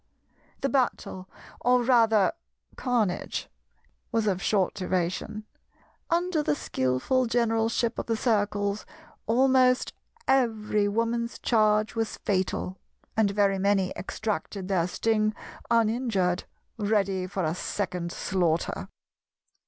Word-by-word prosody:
The 275 - +1
battle, 240 -8 -1 0.3
or 250 0 +3
rather 225 -5 +4 0.4
carnage, 230 -8 -1 0.6
was 225 -2 +1
of 190 -3 0
short 195 -3 +1
duration. 185 +2 -2 0.6
Under 345 -1 +1
the 220 - +1
skillful 130 - 0
generalship 230 0 +1
of - - -4
the 230 - +1
Circles 205 -3 0 0.4
almost 255 +1 +3 0.3
every 220 -5 +2
Woman's 230 +2 -1
charge 215 -2 +2
was 225 -1 -2
fatal 190 -1 -1 0.4
and 215 -2 +3
very 200 -1 +2
many 195 -1 +2
extracted 200 -2 -4
their 175 -3 +2
sting 215 +2 +1 0.3
uninjured, 225 -5 +1 0.3
ready 200 -3 +1
for 190 0 -3
a 155 0 0
second 180 -2 -3
slaughter. 170 -4 -1
215 Hz, 105 wpm, -27 LUFS, 190-235 Hz, 0.6 s, rather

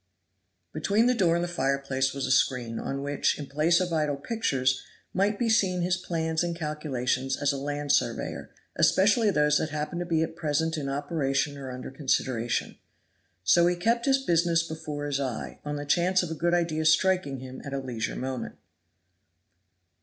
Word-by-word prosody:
Between 210 +4 +2
the 250 - +4
door 180 -8 +3
and 170 - 0
the - - -1
fireplace 135 -4 0
was 140 0 -3
a - - -1
screen, 125 -3 +1
on 140 0 -4
which, 145 0 0
in 145 - -5
place 155 +5 +2
of 180 -2 -1
idle 150 -2 +1
pictures, 135 - 0 0.3
might 200 +3 +1
be 240 - 0
seen 190 -5 +2
his 180 +1 +2
plans 165 -2 -1
and 170 -1 -2
calculations 135 -5 -2
as 145 0 +1
a - - -3
land 145 +1 -2
surveyor, - - -1 0.3
especially 215 +3 +4
those 150 -5 +3
that 155 - -2
happened 155 +3 -3
to 175 - -3
be 160 -2 +2
at 165 - -5
present 160 +1 0
in 145 -3 -3
operation 140 -1 -1
or 135 -2 -7
under 125 0 -7
consideration. 130 -4 -1 0.6
So 170 - +5
he 175 - +2
kept 230 +8 +1
his 270 0 +5
business 170 -1 +2
before 155 -2 -5
his 140 -1 -1
eye, 130 -5 -4
on 145 0 -3
the 145 0 -4
chance 180 +5 +2
of 170 - -4
a - - -1
good 170 +2 +1
idea 160 -2 0
striking 170 -3 +3
him 130 0 -9
at 140 - -7
a 140 - -2
leisure 125 -4 -3
moment. 130 0 -4
150 Hz, 185 wpm, -27 LUFS, 135-175 Hz, 0.6 s, So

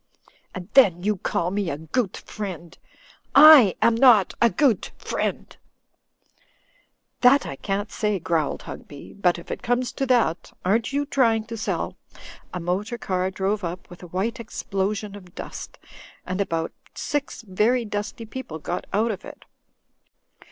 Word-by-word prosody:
And 180 -2 -6
then 185 -10 +5
you 210 0 +1
call 175 0 -1
me 200 -2 -1
a 140 - -3
goot 180 +7 -2
friend. 180 -5 -7 0.6
I 285 - +9
am 235 - +5
not 230 -5 +5
a 235 - +6
goot 255 -4 +1
friend - - -3 0.8
!" - - -39
"That 265 +3 +6
I 140 - -5
can't 200 +7 -3
say," 210 -2 0
growled 165 -3 -1
Hugby, 145 -1 -10
"but 180 -3 +1
if 170 - -10
it - - -4
comes 245 +1 0
to 270 - -3
that 235 -10 +1
— - - -21
^aren't 220 +7 +1
you 285 +1 0
trying 230 -6 +2
to 230 0 -6
sell 220 - -3 0.2
— - - -14
" - - -29
A 180 - -4
motor 190 +7 -2
car 185 -4 -1
drove 195 +2 -2
up 175 +1 -6
with 175 - -12
a 180 - -9
white 190 +8 -2
explosion 205 -1 -3
of 180 -3 -13
dust, - - -8 0.5
and 185 +2 -2
about 165 -4 -2 0.2
six 290 -3 -3
very 225 +5 +1
dusty 210 +3 -4
people 225 -8 -7
got 175 +3 -5
out 220 +3 +1
of 195 -2 -6
it. - - -12
205 Hz, 165 wpm, -24 LUFS, 180-235 Hz, 0.8 s, I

